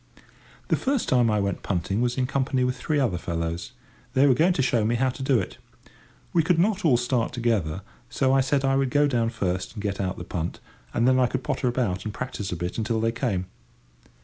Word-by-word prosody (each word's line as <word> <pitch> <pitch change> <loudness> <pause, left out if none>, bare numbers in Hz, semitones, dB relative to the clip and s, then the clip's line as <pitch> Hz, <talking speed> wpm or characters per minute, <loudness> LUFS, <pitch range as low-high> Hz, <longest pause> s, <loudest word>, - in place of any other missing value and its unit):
The - - +4
first 270 -2 0
time 120 -3 +3
I 105 -1 +2
went 100 0 -1
punting 95 +3 -1
was 125 +1 0
in 130 - +1
company 130 0 0
with 125 0 0
three 150 +3 -1
other 110 -11 +1
fellows; 85 0 -3 0.4
they 135 +2 +5
were 135 - +6
going 170 +8 +3
to 145 - 0
show 120 -3 +2
me 115 +3 +1
how 130 +2 +2
to 130 - -9
do 130 -2 +3
it. 95 - -6 0.7
We 170 - +5
could 165 +2 +2
not 195 +4 +2
all 140 -8 +5
start 120 -1 0
together, 105 -8 -1 0.3
so 130 +2 +1
I 135 - +5
said 135 +1 +1
I 135 0 +3
would 135 -1 +1
go 145 +3 +3
down 120 -4 +1
first 95 -5 -2
and 105 - -6
get 100 -1 -2
out 95 -1 -2
the - - -6
punt, 85 -1 -4 0.3
and 115 - +2
then 130 0 +4
I 125 - +4
could 130 +1 -3
potter 135 -3 -1
about 115 -7 -1
and 110 - -4
practice 105 -4 -5
a - - -2
bit 90 +5 -4
until 110 0 0
they 115 +1 +1
came. 115 -6 -1
120 Hz, 230 wpm, -25 LUFS, 100-135 Hz, 0.7 s, were